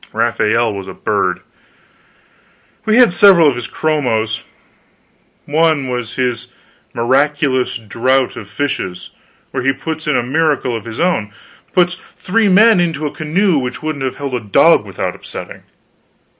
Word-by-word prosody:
Raphael 115 Hz, +1 st, +1 dB
was 100 Hz, -1 st, -7 dB
a -, -, -8 dB
bird. -, -, -1 dB, 1.4 s
We 220 Hz, +1 st, +3 dB
had 245 Hz, -8 st, +6 dB
several 180 Hz, -5 st, +6 dB
of 140 Hz, -, +2 dB
his 120 Hz, -, -5 dB
chromos; 115 Hz, -8 st, -1 dB, 1.0 s
one 155 Hz, -3 st, +1 dB
was 125 Hz, -2 st, -4 dB
his 125 Hz, -2 st, -2 dB, 0.4 s
"Miraculous 130 Hz, +1 st, +1 dB
Draught 125 Hz, +4 st, 0 dB
of 105 Hz, -, -9 dB
Fishes," 115 Hz, -10 st, -4 dB, 0.4 s
where 130 Hz, -, -3 dB
he 135 Hz, +2 st, +2 dB
puts 155 Hz, +3 st, -6 dB
in 150 Hz, -, +2 dB
a -, -, 0 dB
miracle 140 Hz, -2 st, 0 dB
of 115 Hz, -, -6 dB
his 115 Hz, -1 st, -7 dB
own 165 Hz, -, 0 dB, 0.4 s
puts 180 Hz, 0 st, +1 dB, 0.2 s
three 200 Hz, +4 st, +1 dB
men 215 Hz, +1 st, +5 dB
into 165 Hz, -4 st, -1 dB
a 145 Hz, -, -2 dB
canoe 165 Hz, +2 st, +1 dB
which 125 Hz, +3 st, -5 dB
wouldn't 155 Hz, -3 st, -3 dB
have 130 Hz, -, -2 dB
held 140 Hz, -2 st, -5 dB
a 125 Hz, -, 0 dB
dog 105 Hz, -3 st, +4 dB
without -, -, -4 dB
upsetting. -, -, -9 dB
140 Hz, 145 wpm, -16 LUFS, 120-165 Hz, 1.4 s, had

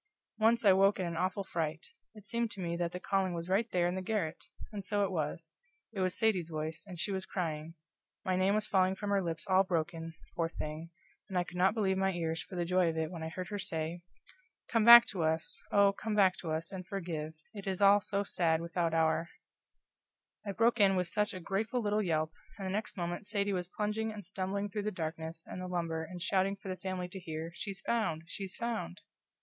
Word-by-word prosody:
Once 230 Hz, +1 st, +4 dB
I 195 Hz, -, +8 dB
woke 195 Hz, +1 st, +4 dB
in 185 Hz, -, 0 dB
an 170 Hz, -1 st, -3 dB
awful 185 Hz, +3 st, 0 dB
fright 160 Hz, -3 st, -3 dB, 0.3 s
it 210 Hz, -2 st, -13 dB
seemed 235 Hz, +2 st, 0 dB
to 200 Hz, -, -10 dB
me 170 Hz, -2 st, -2 dB
that 170 Hz, -1 st, -1 dB
the 180 Hz, -, -5 dB
calling 190 Hz, -1 st, 0 dB
was 170 Hz, +1 st, -5 dB
right 215 Hz, +5 st, +2 dB
there 175 Hz, -1 st, +2 dB
in 175 Hz, -, -1 dB
the 190 Hz, -, -2 dB
garret! 185 Hz, -5 st, -2 dB, 0.3 s
And 205 Hz, -2 st, -5 dB
so 205 Hz, +1 st, +1 dB
it 195 Hz, -, 0 dB
was: 160 Hz, 0 st, -3 dB, 0.4 s
it 200 Hz, -, -4 dB
was 185 Hz, -1 st, +1 dB
Sadie's 190 Hz, -7 st, +2 dB
voice, 155 Hz, +2 st, -4 dB
and 180 Hz, -3 st, -8 dB
she 200 Hz, -, -1 dB
was 190 Hz, -1 st, -3 dB
crying; 165 Hz, -3 st, -3 dB, 0.5 s
my 185 Hz, -, +1 dB
name 190 Hz, +2 st, +3 dB
was 215 Hz, 0 st, +1 dB
falling 190 Hz, -2 st, +3 dB
from 205 Hz, +1 st, -3 dB
her 200 Hz, -1 st, +3 dB
lips 165 Hz, -2 st, -3 dB
all 190 Hz, 0 st, +5 dB
broken, 165 Hz, -2 st, -2 dB, 0.2 s
poor 165 Hz, -2 st, 0 dB
thing, 155 Hz, +1 st, -5 dB, 0.4 s
and 190 Hz, -, -2 dB
I 180 Hz, -, +3 dB
could 180 Hz, -, -9 dB
not 190 Hz, +4 st, +4 dB
believe 190 Hz, -4 st, +1 dB
my 190 Hz, 0 st, +2 dB
ears 165 Hz, -1 st, -1 dB
for 190 Hz, -, -10 dB
the 175 Hz, -1 st, 0 dB
joy 180 Hz, 0 st, +3 dB
of 160 Hz, -, -3 dB
it 160 Hz, 0 st, -1 dB
when 170 Hz, -3 st, -6 dB
I 160 Hz, -, -3 dB
heard 180 Hz, +2 st, -5 dB
her 205 Hz, -1 st, -3 dB
say: 165 Hz, -1 st, -3 dB, 0.7 s
"Come 230 Hz, -2 st, +2 dB
back 235 Hz, +1 st, +12 dB
to 185 Hz, -, -2 dB
us 160 Hz, +1 st, 0 dB
oh, 200 Hz, -1 st, +5 dB
come 215 Hz, +1 st, -3 dB
back 190 Hz, -3 st, +5 dB
to 165 Hz, -, -6 dB
us, 160 Hz, +1 st, -2 dB
and 190 Hz, -1 st, -5 dB
forgive 165 Hz, -5 st, -4 dB, 0.2 s
it 200 Hz, -2 st, -8 dB
is 190 Hz, -1 st, -1 dB
all 200 Hz, 0 st, +7 dB
so 200 Hz, 0 st, -1 dB
sad 165 Hz, -5 st, +1 dB
without 170 Hz, 0 st, -1 dB
our 160 Hz, +1 st, +2 dB, 0.6 s
" -, -, -46 dB
I -, -, 0 dB
broke 230 Hz, +4 st, +3 dB
in 195 Hz, -2 st, +6 dB
with 180 Hz, -2 st, 0 dB
SUCH 210 Hz, 0 st, 0 dB
a -, -, -4 dB
grateful 200 Hz, +7 st, -1 dB
little 210 Hz, -1 st, +1 dB
yelp, 160 Hz, -4 st, 0 dB, 0.3 s
and 195 Hz, -, -5 dB
the 190 Hz, -, -2 dB
next 210 Hz, +1 st, -3 dB
moment 175 Hz, +3 st, -3 dB
Sadie 205 Hz, -1 st, 0 dB
was 180 Hz, -2 st, -2 dB
plunging 210 Hz, +3 st, -2 dB
and 210 Hz, -3 st, -8 dB
stumbling 195 Hz, +2 st, -2 dB
through 205 Hz, +1 st, -3 dB
the 210 Hz, -, -1 dB
darkness 160 Hz, -2 st, -5 dB
and 185 Hz, -, -7 dB
the 185 Hz, -, -4 dB
lumber 170 Hz, -3 st, -2 dB
and 175 Hz, +2 st, -7 dB
shouting 195 Hz, 0 st, +2 dB
for 195 Hz, -, -9 dB
the 185 Hz, -, -5 dB
family 185 Hz, -2 st, -3 dB
to 190 Hz, -, -7 dB
hear, 160 Hz, -1 st, -5 dB
"She's 195 Hz, +2 st, -5 dB
found, 190 Hz, -9 st, 0 dB
she's 195 Hz, +3 st, -5 dB
found!" 235 Hz, -, -3 dB
185 Hz, 230 wpm, -33 LUFS, 165-200 Hz, 0.7 s, back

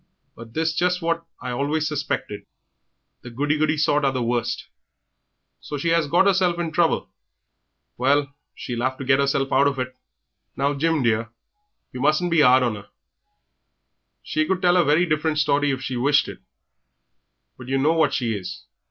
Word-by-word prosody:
But 115 Hz, 0 st, -12 dB
'tis 160 Hz, 0 st, 0 dB
just 180 Hz, +1 st, 0 dB
what 170 Hz, 0 st, -1 dB, 0.2 s
I 125 Hz, -, -4 dB
always 145 Hz, +5 st, -1 dB
suspected. 140 Hz, -9 st, -4 dB, 0.7 s
The 125 Hz, -, -9 dB
goody 145 Hz, +5 st, -1 dB
goody 155 Hz, 0 st, +1 dB
sort 150 Hz, -1 st, +2 dB
are 135 Hz, -, +2 dB
the 130 Hz, -2 st, -2 dB
worst. 120 Hz, 0 st, -2 dB, 0.9 s
So 145 Hz, -, -6 dB
she 165 Hz, +4 st, 0 dB
'as 165 Hz, -3 st, +2 dB
got 175 Hz, +6 st, +3 dB
'erself 185 Hz, -3 st, +2 dB
into 170 Hz, -2 st, -3 dB
trouble! 165 Hz, 0 st, +1 dB, 0.9 s
Well, 140 Hz, +2 st, +1 dB, 0.2 s
she'll 120 Hz, -1 st, -5 dB
'ave 130 Hz, +1 st, -1 dB
to 135 Hz, -, -6 dB
get 135 Hz, +1 st, +3 dB
'erself 140 Hz, -1 st, 0 dB
out 140 Hz, +2 st, +4 dB
of 140 Hz, -1 st, -1 dB
it." 130 Hz, 0 st, -4 dB, 0.6 s
"Now, 140 Hz, +2 st, 0 dB
Jim, 155 Hz, 0 st, 0 dB
dear, 115 Hz, -1 st, 0 dB, 0.6 s
yer 125 Hz, -, -7 dB
mustn't 155 Hz, +5 st, +2 dB
be 165 Hz, -2 st, +4 dB
'ard 130 Hz, -1 st, +5 dB
on 115 Hz, -4 st, -1 dB
'er; 100 Hz, -, -13 dB, 1.4 s
she 155 Hz, 0 st, -1 dB
could 185 Hz, -1 st, -1 dB
tell 180 Hz, 0 st, +4 dB
a 175 Hz, -, +5 dB
very 150 Hz, +5 st, +3 dB
different 155 Hz, -1 st, 0 dB
story 145 Hz, 0 st, +2 dB
if 135 Hz, -1 st, -2 dB
she 130 Hz, -2 st, -3 dB
wished 145 Hz, +4 st, +2 dB
it, -, -, -9 dB, 1.2 s
but 130 Hz, -, -12 dB
yer 135 Hz, +1 st, 0 dB
know 150 Hz, +4 st, +2 dB
what 160 Hz, -3 st, +2 dB
she 115 Hz, -3 st, -1 dB
is. 95 Hz, -3 st, -7 dB
145 Hz, 180 wpm, -23 LUFS, 130-160 Hz, 1.4 s, ard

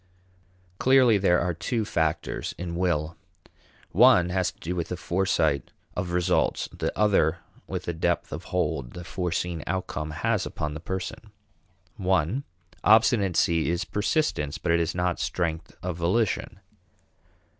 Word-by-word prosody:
Clearly 130 Hz, -5 st, +5 dB
there 90 Hz, -2 st, +4 dB
are 90 Hz, 0 st, 0 dB
two 110 Hz, +7 st, -2 dB
factors 80 Hz, -5 st, -1 dB
in 85 Hz, -1 st, -4 dB
will. 85 Hz, -3 st, 0 dB, 0.8 s
One 110 Hz, -4 st, +6 dB
has 90 Hz, 0 st, 0 dB
to -, -, -31 dB
do 90 Hz, +2 st, -4 dB
with 85 Hz, -2 st, -2 dB
the 90 Hz, -, -4 dB
foresight 85 Hz, -6 st, 0 dB, 0.3 s
of 90 Hz, 0 st, -2 dB
results, 90 Hz, +1 st, +1 dB
the -, -, -2 dB
other 95 Hz, -6 st, +3 dB, 0.3 s
with -, -, -4 dB
the 85 Hz, -, -2 dB
depth 85 Hz, +1 st, -1 dB
of -, -, -6 dB
hold 60 Hz, -3 st, -2 dB
the 90 Hz, -, -7 dB
foreseen 85 Hz, -2 st, -2 dB
outcome 85 Hz, -4 st, -3 dB
has 75 Hz, -, 0 dB
upon 75 Hz, -1 st, -4 dB
the 80 Hz, -, -6 dB
person. 95 Hz, +5 st, -5 dB, 0.7 s
(I) 95 Hz, -, +1 dB, 0.4 s
Obstinacy 100 Hz, -7 st, +4 dB
is 85 Hz, 0 st, -1 dB
persistence 105 Hz, -, 0 dB
but 85 Hz, -, -1 dB
it 85 Hz, -, +4 dB
is 85 Hz, 0 st, -1 dB
not 90 Hz, -1 st, 0 dB
strength 85 Hz, -2 st, -2 dB
of 90 Hz, -2 st, -3 dB
volition. 95 Hz, +3 st, 0 dB
90 Hz, 140 wpm, -26 LUFS, 85-95 Hz, 0.8 s, One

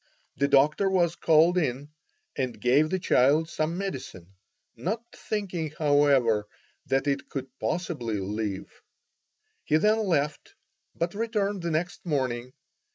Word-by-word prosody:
The 140 Hz, +3 st, +2 dB
doctor 150 Hz, +8 st, +3 dB
was 175 Hz, -3 st, +2 dB
called 165 Hz, +3 st, +4 dB
in 140 Hz, -2 st, -2 dB, 0.5 s
and 130 Hz, -5 st, -3 dB
gave 135 Hz, +7 st, +3 dB
the 190 Hz, -, 0 dB
child 150 Hz, -1 st, +3 dB
some 155 Hz, +2 st, -1 dB
medicine, 130 Hz, -, -6 dB, 0.4 s
not 220 Hz, +6 st, -3 dB
thinking, 185 Hz, -7 st, -3 dB
however, 140 Hz, -8 st, +3 dB, 0.4 s
that 135 Hz, -1 st, +1 dB
it 140 Hz, -1 st, -1 dB
could 135 Hz, -2 st, -4 dB
possibly 145 Hz, -, -2 dB
live. 100 Hz, 0 st, -4 dB, 0.8 s
He 155 Hz, -, +2 dB
then 215 Hz, +6 st, +3 dB
left, 150 Hz, -4 st, -1 dB, 0.4 s
but 170 Hz, +1 st, -2 dB
returned 205 Hz, -3 st, -1 dB
the 170 Hz, -, -2 dB
next 170 Hz, +4 st, -2 dB
morning. 130 Hz, -6 st, -2 dB
150 Hz, 125 wpm, -27 LUFS, 130-175 Hz, 0.8 s, called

